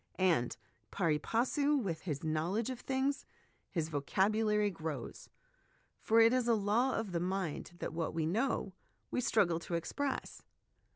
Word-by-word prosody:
And, 170 -11 +2 0.3
pari 165 -6 +1
passu 280 - +1
with 180 - -2
his 150 -6 -4
knowledge 170 +10 0
of 250 - -6
things, 270 +2 -1 0.5
his 165 -3 -2
vocab 190 +8 +1
ulary 210 -2 +2
grows; 155 -6 -6 0.7
for 225 +1 +3
it 230 +1 +7
is 255 -2 +1
a 235 - +5
law 220 +6 +2
of 225 -4 -2
the 170 - 0
mind 180 -2 -2
that - - -4
what 165 -1 -2
we 160 -2 0
know, 205 +2 0 0.4
we - - 0
struggle 175 -8 +2
to 170 0 -4
express. 270 - -3
195 Hz, 155 wpm, -34 LUFS, 165-230 Hz, 0.7 s, it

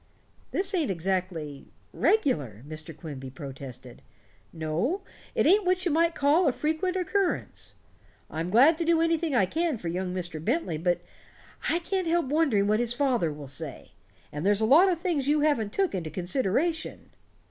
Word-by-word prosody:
"This 380 +1 -1
ain't 330 - +1
exactly 175 -5 -3 0.3
regular," 145 - +1
Mr. 155 +1 -7
Quimby 140 -5 -7
protested. 130 -3 -9 0.5
"No, 170 - -1 0.3
it - - +2
ain't 400 +6 +5
what 365 0 +1
you 345 - +2
might 330 +2 +2
call 295 +5 +3
a - - +4
frequent 315 +7 -1
occurrence. 375 +1 -1 0.5
I'm 165 +3 -4
glad 275 - +5
to - - +1
do 335 0 +3
anything 330 -3 +1
I 200 - +4
can 320 - -1
for 175 -5 -5
young 180 +2 -2
Mr. 175 -4 -4
Bentley, 220 - -1
but 175 +1 +1 0.7
I 335 - +2
can't 365 +1 -2
help 340 -1 +2
wondering 275 -8 +2
what 210 +1 +2
his 240 0 +1
father 245 - +1
will 145 -1 -8
say. 140 - -6 0.4
And 150 +1 -5
there's 205 +1 +3
a 220 - +2
lot 320 - +6
of 340 - -1
things 330 -6 -1
you 295 +1 +3
haven't 245 -9 +1
took 390 -2 0
into 170 -4 -3
consideration." 260 - -1
240 Hz, 170 wpm, -27 LUFS, -, 0.7 s, lot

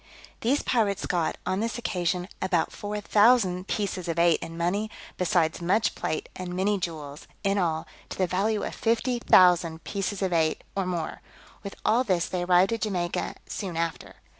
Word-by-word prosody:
These 265 +6 +1
pirates 205 -5 +1
got, 170 -3 0
on 185 +1 0
this 230 +3 -2
occasion, 180 -5 -1
above 180 -3 +1
four 210 0 -4
thousand 205 -4 +4
pieces 190 -4 -2
of 165 -1 -2
eight 170 -1 +4
in 165 0 -7
money, 195 +6 0 0.3
besides 175 -2 +1
much 200 +6 +2
plate, 155 - -3
and 180 -1 -5
many 200 +2 +1
jewels; 155 -4 -6 0.2
in 200 0 +2
all, 160 -3 0 0.2
to - - -6
the 185 - +2
value 205 +4 0
of - - -4
fifty 235 +2 0
thousand 175 -6 +5
pieces 200 0 -3
of 185 -2 0
eight, 160 -2 +1
or 195 -2 -1
more: 170 -3 -3 0.4
with 200 -1 -7
all 235 +4 +4
this 185 -7 +1
they 180 - -2
arrived 180 +3 +4
at 230 - -3
Jamaica 180 -5 -2
soon 185 -5 -5
after. 165 0 -3
185 Hz, 175 wpm, -27 LUFS, 170-205 Hz, 0.4 s, thousand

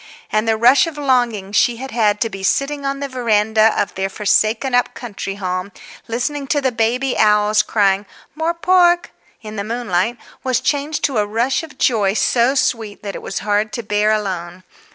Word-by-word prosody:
And 215 +1 0
the 220 -1 +2
rush 250 +8 +5
of 320 -3 -7
longing 245 -8 0
she 235 +4 +3
had 265 +3 -7
had 210 -3 +1
to 225 - +1
be 195 - -7
sitting 275 +7 0
on 275 0 -3
the 280 - -2
veranda 220 -3 +2
of 200 - -1
their 190 +1 -2
forsaken 220 +5 +1
up 245 0 +1
country 200 -4 -6
home, 185 0 -4 0.4
listening 260 +5 -3
to 290 - +1
the 265 -2 0
baby 245 +3 0
owls 210 0 +4
crying 200 -2 +1 0.3
"More 320 +3 -1
pork" 350 0 +3 0.3
in 215 0 -8
the 200 - -2
moonlight, 225 -1 -1 0.3
was 255 -2 +1
changed 290 +1 -1
to 265 -6 +1
a 205 - 0
rush 235 +5 0
of 325 -2 -12
joy 210 -6 +2
so 245 +4 +2
sweet 225 -6 -1
that 200 -1 -5
it - - -7
was 195 - -5
hard 210 +1 +1
to 235 - -4
bear 210 +1 +1
alone. 185 -4 -3
225 Hz, 190 wpm, -18 LUFS, 205-265 Hz, 0.4 s, rush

